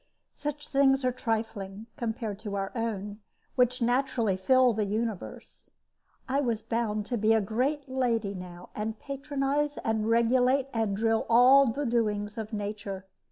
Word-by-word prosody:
Such 295 0 -5
things 270 -1 +3
are 255 - +3
trifling, 220 -4 -3
compared 225 -3 -3
to 210 -2 -5
our 195 -1 -2
own, 210 -3 -3 0.3
which 250 -1 +2
naturally 240 -4 +1
fill 255 +6 +4
the 215 -1 0
universe. 215 0 -5 0.6
I 270 +2 +1
was 230 -5 -1
bound 220 -2 -1
to 240 +2 -2
be 215 +2 +4
a - - +4
great 255 +8 -1
lady 235 -6 0
now, 180 -1 -9
and 215 +1 -3
patronize 285 +1 -2
and 220 0 0
regulate 250 +4 +3
and 220 -4 0
drill 225 +1 +1
all 255 +4 +7
the 280 +5 -1
doings 210 -3 0
of 220 0 -5
nature. 205 -2 -5
230 Hz, 150 wpm, -28 LUFS, 210-255 Hz, 0.6 s, all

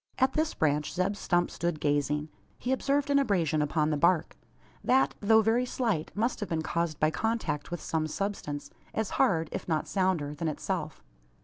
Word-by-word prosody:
At 260 +1 +3
this 310 0 0
branch 150 -1 +1
Zeb 185 +4 0
Stump 175 -3 +1
stood 170 -2 -2
gazing. 145 +1 0 0.3
He 250 - -3
observed 280 +2 +1
an 280 - +5
abrasion 170 - +1
upon 150 +1 +1
the 150 - +1
bark; 170 -1 +3 0.5
that, 265 +1 +3
though 220 +1 +5
very 225 +3 +3
slight, 225 -12 -1
must 230 +4 0
have 210 - -4
been 160 -1 -1
caused 165 -1 -1
by 155 0 +3
contact 180 -9 -1
with 175 - -4
some 160 -1 -1
substance, 155 -5 -4 0.2
as 220 -2 -1
hard, 165 -3 +3
if - - -5
not 160 -3 0
sounder, 185 -7 0
than 160 +2 -3
itself. 150 - -3
175 Hz, 180 wpm, -29 LUFS, 155-220 Hz, 0.5 s, an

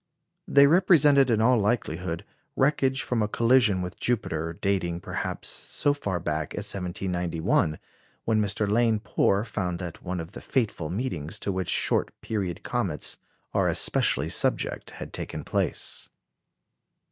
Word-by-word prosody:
They 140 0 +7
represented, 150 -5 +5
in 110 -2 +2
all 125 +1 +4
likelihood, 90 -6 -1 0.3
wreckage 135 -1 +2
from 120 -3 -1
a 105 - +1
collision 115 -4 +3
with 90 - -7
Jupiter, 85 -9 0
dating, 90 -2 -1
perhaps, - - -4
so 145 - 0
far 100 -11 -3
back 75 -2 -3
as 105 0 0
1791, 90 -4 -1 0.5
when 110 -1 +2
Mr. 105 +1 0
Lane 110 +1 +2
Poor 100 -2 +1
found 90 -6 -3
that 85 -2 -7
one 90 0 -4
of 80 +2 -7
the - - -9
fateful 105 - -1
meetings 90 - -3
to 100 - -2
which 95 -1 -2
short - - +1
period 95 -6 -3
comets - - -2 0.3
are - - +2
especially - - +2
subject - - -1
had - - -9
taken - - -5
place. - - -2
100 Hz, 140 wpm, -26 LUFS, 90-120 Hz, 0.5 s, They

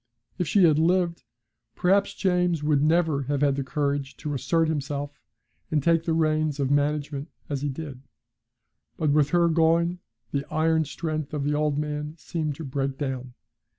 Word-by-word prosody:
If 180 - 0
she 200 - +4
had 155 -3 +5
lived 170 -3 +1 0.5
perhaps 195 +2 +2
James 180 -4 +1
would 150 -2 +2
never 160 -2 +2
have 145 -1 0
had 140 -2 +3
the 140 - -2
courage 140 +1 -2
to 150 - -4
assert 165 +4 +1
himself 145 -2 -3 0.5
and 150 -3 +1
take 165 0 +3
the 165 - +1
reins 155 -2 +1
of 140 -1 0
management 145 +1 0 0.2
as 140 -2 -2
he 145 - -1
did. 135 -2 -7 1.0
But 155 -3 +1
with 145 -1 +3
her 175 -1 +3
going 170 +2 +2 0.3
the 140 -1 -1
iron 160 0 +2
strength 155 0 -4
of 145 - -2
the 145 +1 0
old 150 -1 +1
man 150 0 -3
seemed 155 -3 -3
to 160 - -7
break 135 -1 -2
down. 130 -3 -4
150 Hz, 170 wpm, -26 LUFS, 140-165 Hz, 1.0 s, had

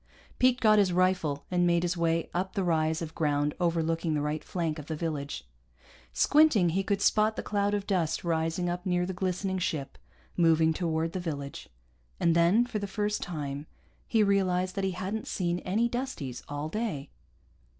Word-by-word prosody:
Pete 255 0 +4
got 215 -2 +5
his 195 -3 +3
rifle 180 -5 +1
and 175 -1 +3
made 170 0 +2
his 175 0 0
way 165 -1 +1
up 185 +4 -2
the 195 - 0
rise 160 -1 +1
of 160 - -7
ground 145 -1 0
overlooking 165 -2 0
the 150 - 0
right 150 +1 -2
flank 165 -3 -2
of 150 - -9
the 160 - -3
village. 150 - -4 0.6
Squinting, 230 - +4
he 185 +4 +1
could 200 0 -1
spot 215 0 +3
the - - -4
cloud 205 0 0
of 200 -1 -3
dust 175 -6 0
rising 165 +1 0
up 175 0 -2
near 180 -2 +1
the 190 - -4
glistening 185 +1 -2
ship, 150 -6 -3 0.4
moving 160 -2 +4
toward 165 -1 -1
the 185 - -3
village. 140 - -5 0.5
And 165 -1 +3
then, 175 +8 +4
for 240 -3 -3
the 200 - -4
first 210 +1 -1
time, 145 -3 -5 0.4
he 225 -2 +3
realized 185 -2 +1
that 195 0 -3
he 190 - -1
hadn't 195 +4 -3
seen 175 -2 -1
any 215 +7 +1
Dusties 240 - -4
all 145 +1 -3
day. 170 -7 -3
175 Hz, 180 wpm, -29 LUFS, 160-195 Hz, 0.6 s, got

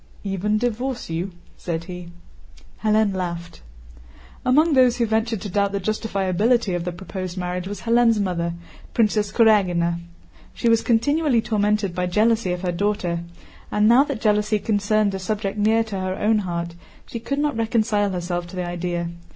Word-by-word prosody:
"Even 200 +2 0
divorce 245 -1 -2
you?" 175 +4 -2 0.3
said 165 -2 -3
he. 180 0 -8 0.7
Hélène 215 -1 +3
laughed. 170 - -5 0.8
Among 305 +5 +4
those 255 -3 +4
who 235 - +2
ventured 220 -1 0
to 205 - -5
doubt 200 +1 0
the 200 - 0
justifiability 205 +1 0
of 175 -1 -3
the 180 - -2
proposed 185 0 -6
marriage 180 0 -3
was 200 -1 -6
Hélène's 230 -1 +3
mother, 170 -3 -1 0.4
Princess 210 -2 +2
Kurágina. 180 -7 +3 0.6
She - - -1
was 230 -1 +4
continually 265 +3 +2
tormented 210 -3 0
by 180 0 -1
jealousy 215 +1 +2
of 180 +1 -3
her 180 - 0
daughter, 180 -2 -1 0.5
and 210 0 +3
now 240 +4 +7
that 220 - -4
jealousy 210 0 +2
concerned 210 0 +1
a 190 - -3
subject 205 +1 -3
near 220 +2 +3
to 210 -4 -5
her 185 0 -2
own 215 +2 +2
heart, 170 -3 -3 0.3
she 230 - -6
could 275 +5 -3
not 295 -2 0
reconcile 220 -2 +1
herself 175 -1 -3
to 185 - -10
the 180 -1 -2
idea. 175 -1 -3
205 Hz, 165 wpm, -23 LUFS, 180-225 Hz, 0.8 s, now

